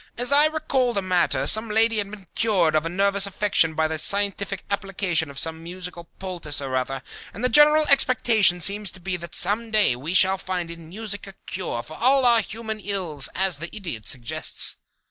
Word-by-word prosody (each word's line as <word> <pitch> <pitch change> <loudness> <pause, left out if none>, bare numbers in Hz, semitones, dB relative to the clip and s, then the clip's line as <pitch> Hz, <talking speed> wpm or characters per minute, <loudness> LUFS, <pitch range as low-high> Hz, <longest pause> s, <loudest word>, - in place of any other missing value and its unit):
"As 245 +3 +2
I 290 +2 +5
recall 270 -5 -1
the 200 -3 -2
matter, 180 -2 +1
some 220 +1 +5
lady 225 +1 +2
had 200 -1 -3
been 200 -2 -12
cured 190 -8 +1
of 155 +1 0
a - - -4
nervous 200 +2 +2
affection 195 -5 +1
by 160 - +1
a 155 0 -2
scientific 200 +2 -1
application 195 -5 -1
of 140 - -12
some 160 +2 -2
musical 175 0 -8
poultice 175 -6 -3
or 135 -2 -4
other, 130 +1 -3 0.3
and 215 - -8
the 250 - +2
general 300 +4 +5
expectation 235 -9 +4
seems 200 +3 +2
to - - -9
be 185 +1 -3
that 170 0 -7
some 215 +5 +1
day 215 - +3
we 150 +9 -5
shall 190 +1 +5
find 180 -2 -4
in 165 -1 -12
music 205 +1 -6
a 195 - -10
cure 175 -10 -5
for 155 +5 -11
all 265 +2 +3
our 235 -2 +5
human 220 0 -7
ills, 180 - -1
as 190 -4 0
the 170 +3 -6
Idiot 165 - -7
suggests." 120 -3 -2
195 Hz, 200 wpm, -23 LUFS, 170-220 Hz, 0.3 s, I